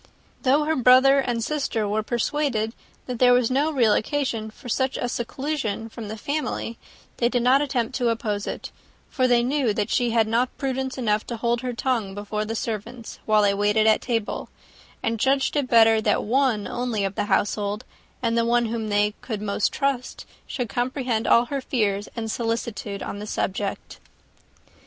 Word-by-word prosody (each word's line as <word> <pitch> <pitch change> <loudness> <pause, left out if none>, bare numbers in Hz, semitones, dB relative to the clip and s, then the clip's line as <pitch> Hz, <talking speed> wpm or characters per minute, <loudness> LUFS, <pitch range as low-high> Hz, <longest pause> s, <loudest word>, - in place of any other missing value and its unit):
Though 280 +3 +3
her 315 +1 0
brother 260 +2 +6
and 240 -3 -1
sister 235 -6 -1
were 210 +2 0
persuaded 235 -1 -1 0.3
that 250 -2 -5
there 250 -1 +6
was 245 -1 +3
no 285 +4 +2
real 240 -8 +3
occasion 230 -3 -1
for 220 - -13
such 260 +2 0
a 245 - -1
seclusion 240 -2 -3
from 225 -1 -8
the 220 +2 -6
family, 280 -3 -3 0.4
they 235 - +2
did 245 -1 0
not 260 +3 +5
attempt 255 -5 -1
to 245 -2 +1
oppose 210 -3 -2
it; - - -5 0.4
for 255 -2 +2
they 240 -1 +4
knew 255 -4 +1
that 210 -2 -1
she 245 -1 +2
had 225 -1 +2
not 235 +3 0
prudence 265 -1 -2
enough 215 -4 0
to 235 - -4
hold 235 +1 0
her 250 -1 -3
tongue 230 -6 -1
before 210 +1 -3
the 225 +1 -4
servants, 225 +1 -5
while 215 -1 +4
they 200 -1 +3
waited 210 +2 +2
at 220 -1 +4
table, 230 -4 -2 0.5
and 225 0 -1
judged 270 +4 +2
it 285 -3 +1
better 225 -2 +5
that - - +1
one 240 -2 +1
only 240 -4 -2
of 195 - -2
the - - -1
household, 205 +2 0 0.4
and 230 -1 +1
the 230 - +3
one 235 +1 +2
whom 225 -1 -3
they 205 0 +2
could 220 -4 -4
most 205 0 0
trust, 275 -3 -2 0.2
should 245 -3 -3
comprehend 245 -1 -1
all 235 - +5
her 275 +2 -3
fears 205 -6 -1
and 225 -2 -3
solicitude 225 -4 -3
on 205 - -5
the 210 - -6
subject. 195 0 -3
235 Hz, 185 wpm, -24 LUFS, 215-255 Hz, 0.5 s, brother